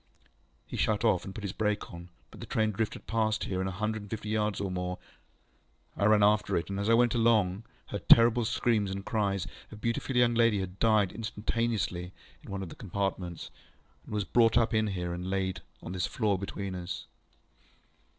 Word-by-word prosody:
He - - -7
shut 105 0 +1
off, 95 -6 +2
and 95 - -8
put 110 - -7
his 100 -2 -3
brake 105 -3 -1
on, 85 +1 -9 0.2
but - - -13
the - - -8
train 110 -1 +1
drifted 110 +1 -3
past 110 -1 0
here 95 -1 -2
a 95 - -1
hundred 110 +3 -2
and 105 - -11
fifty 110 -1 -5
yards 105 -2 0
or 100 -2 -2
more. 90 0 -3 1.0
I 100 - 0
ran 105 0 +5
after 105 +1 +3
it, 85 +3 -3
and, 100 - -2
as 100 +2 -1
I 115 - +6
went 120 0 +4
along, 110 -4 +2 0.2
heard 100 -3 -6
terrible 115 +1 +7
screams 110 -3 +1
and 95 0 -5
cries. 100 -4 0 0.3
A - - -8
beautiful 115 +4 -2
young 120 -1 +4
lady 115 -3 +3
had 95 0 -5
died 110 -4 +3
instantaneously 105 -4 -2 0.3
in - - -13
one 100 -1 -4
of 90 - -7
the - - -10
compartments, 95 -3 -3 0.5
and - - -13
was 105 - +1
brought 115 +4 +3 0.2
in 110 0 +2
here, 90 -3 -3
and 90 +1 -4
laid 95 -1 -1
down 85 - -13 0.2
on 85 - -6
this 90 -2 -1
floor 105 -5 0
between 100 0 -4
us. 90 0 -5
105 Hz, 200 wpm, -30 LUFS, 95-110 Hz, 1.0 s, terrible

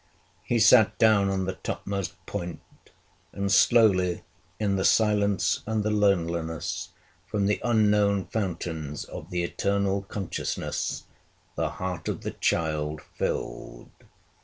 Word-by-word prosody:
He 120 - 0
sat 110 -1 +6
down 105 -3 +4
on 95 -1 -1
the 95 - -2
topmost 100 +1 -4
point; 85 -1 -5 0.7
and 100 0 -2
slowly, 100 -5 +4 0.4
in 100 -2 +1
the 95 - 0
silence 105 -2 +2
and 110 -1 0
the 110 - 0
loneliness, 85 -6 0 0.4
from 100 -2 -1
the 105 +1 +1
unknown 105 -4 +3
fountains 85 -7 -4
of 80 - -9
the 90 -2 -1
eternal 100 +2 0
consciousness, 95 -2 -3 0.5
the - - -1
heart 90 -3 -4
of - - -3
the - - -3
child 75 -2 -1
filled. - - -4
100 Hz, 120 wpm, -26 LUFS, 85-105 Hz, 0.7 s, sat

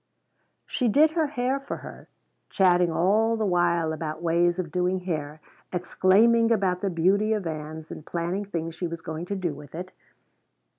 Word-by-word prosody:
She 250 - -1
did 300 +8 +5
her 320 -1 +1
hair 265 -1 -1
for 275 - -6
her, - - -11 0.4
chatting 180 -2 +3
all 215 +7 +2
the 220 - 0
while 170 -3 +1
about 155 -1 -4
ways 170 +1 +2
of 175 -4 -4
doing 180 +1 0
hair, 155 -4 -4 0.3
exclaiming 220 +6 +3
about 190 -5 +1
the 200 - 0
beauty 195 +5 +2
of 210 -4 -2
Ann's 155 0 -6
and - - -8
planning 175 +5 -3
things 165 -4 -4
she 175 +2 -3
was 165 0 -6
going 160 +2 -6
to 200 - -2
do 180 -5 -2
with 145 +1 -12
it. 185 +2 -6
180 Hz, 170 wpm, -26 LUFS, 165-205 Hz, 0.4 s, did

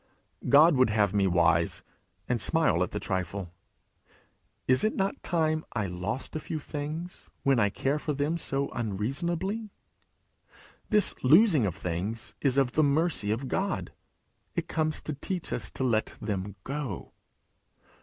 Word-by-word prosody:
God 150 +2 +7
would 130 -2 +5
have 105 -2 +2
me 100 -2 +3
wise, 85 -2 +2 0.4
and 120 -3 0
smile 160 - +2
at 90 - +1
the 105 - -4
trifle. 95 -2 -3 1.2
Is 130 +1 +4
it 215 - +1
not 195 +1 -1
time 155 -2 0
I 110 -4 -1
lost 90 - -4
a - - 0
few 155 - -4
things 155 +4 -6
when 135 -3 +3
I 105 -2 +3
care 135 +8 -1
for 150 - -2
them 145 +4 0
so 140 -4 -1
unreasonably? 165 - -2 1.2
This 210 -3 +4
losing 155 - +5
of 90 - -3
things 95 +7 -3
is 135 -2 +2
of 135 -3 +3
the 155 - +2
mercy 150 -6 +2
of 115 +5 -1
God; 190 +8 -2 0.6
it - - -2
comes 155 -1 -1
to 155 - -3
teach 175 +5 -4
us - - -3
to - - -4
let 110 -4 +1
them 100 -2 -3
go. 135 - -5
135 Hz, 150 wpm, -28 LUFS, 105-155 Hz, 1.2 s, God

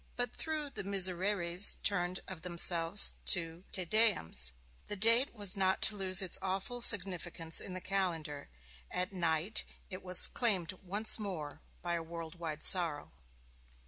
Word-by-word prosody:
But 245 -1 -4
though 310 -2 -4
the 275 - -8
Misereres 185 -1 +1
turned 180 -2 -1
of 185 -4 -10
themselves 170 +1 +3
to 165 -2 +2
Te 185 -2 -2
Deums, 170 - +1 0.4
the 205 - -5
date 230 +6 +3
was 205 -2 -1
not 190 -1 0
to 215 - +2
lose 190 -1 +2
its 185 - -3
awful 195 +6 -5
significance 180 -6 +2
in 185 - -8
the 185 - -7
calendar: 165 -7 -4 0.4
at 185 +2 -4
night 170 +3 -2 0.3
it 185 - -8
was 180 -1 +9
claimed 195 -9 -1
once 205 +5 -1
more 160 -7 -7 0.2
by 175 -1 -3
a 170 - -3
world 165 0 -9
wide 155 -3 -7
sorrow. 165 -6 +1
185 Hz, 145 wpm, -31 LUFS, 170-200 Hz, 0.4 s, was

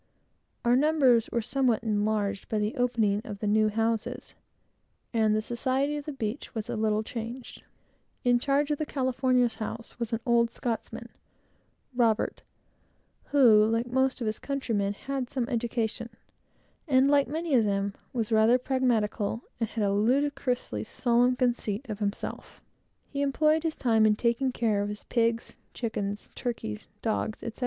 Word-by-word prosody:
Our 240 +1 +5
numbers 270 -5 +4
were 235 - 0
somewhat 250 -3 +1
enlarged 210 -2 -1
by 220 - 0
the 210 +1 -1
opening 225 -5 +1
of 205 - -7
the 210 - -5
new 215 +1 +3
houses, 225 +1 -2 0.8
and 220 -2 +3
the 215 - 0
society 260 +5 0
of 295 -1 -5
the 300 - -4
beach 235 -1 -4
a 220 0 -3
little 215 0 +1
changed. 235 +2 -7 0.6
In 245 -1 +4
charge 285 +3 +1
of 295 - -1
the 310 - -1
Catalina's 255 -2 +1
house, 230 +2 -6
was 235 -1 -3
an 225 - 0
old 235 -1 +3
Scotchman, 230 -1 -4 2.2
who, 235 -7 +6
like 230 +1 +1
most 260 +1 0
of - - -1
his 215 0 -2
countrymen, 225 -8 -1
had 275 +6 -4
a - - -13
pretty 255 -3 0
good 245 - -5
education, 230 -1 -2 0.8
and, 265 -1 +4
like 280 -2 +4
many 320 +2 -2
of 235 -4 +5
them, 200 0 0 0.2
was 230 -3 -2
rather 220 +3 +5
pragmatical, 240 -4 0 0.2
and 225 -2 -1
had 225 - -2
a 200 -1 +2
ludicrously 245 - 0
solemn 245 - +2
conceit. 240 -2 -1 1.2
He 280 - -4
employed 305 +3 +2
his 325 -1 -2
time 225 -3 +3
in 210 - +4
taking 235 +4 +1
care 220 -4 +1
of 205 - -2
his 210 0 -7
pigs, 230 -1 0 0.2
chickens, 205 -3 -3
turkeys, 220 - -4 0.2
dogs, 220 -1 -2
etc. 230 - -6
235 Hz, 150 wpm, -28 LUFS, 215-260 Hz, 2.2 s, who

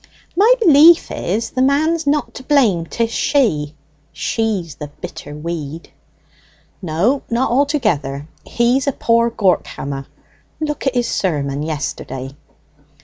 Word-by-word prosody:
"My 415 +7 +5
belief 330 -4 +6
is 215 +6 -2
the 255 - -1
man's 310 +4 +2
not 295 0 0
to - - -8
blame; 230 - +2
'tis 230 +4 -1
she 160 - +1 0.4
she's 180 +1 -2
the 150 - -8
bitter 145 0 -9
weed!" 160 0 -6 0.9
"No, 190 - +1
not 235 +2 0
altogether. 215 - 0 0.2
He's 245 +3 +1
a 280 - +2
poor 235 0 +2
gawk 195 -5 +1
hammer. 135 -1 -6 0.5
Look 300 -3 -3
at 265 - 0
his 245 -1 +1
sermon 145 -6 -1
yesterday." 140 -3 -5
225 Hz, 125 wpm, -18 LUFS, -, 0.9 s, belief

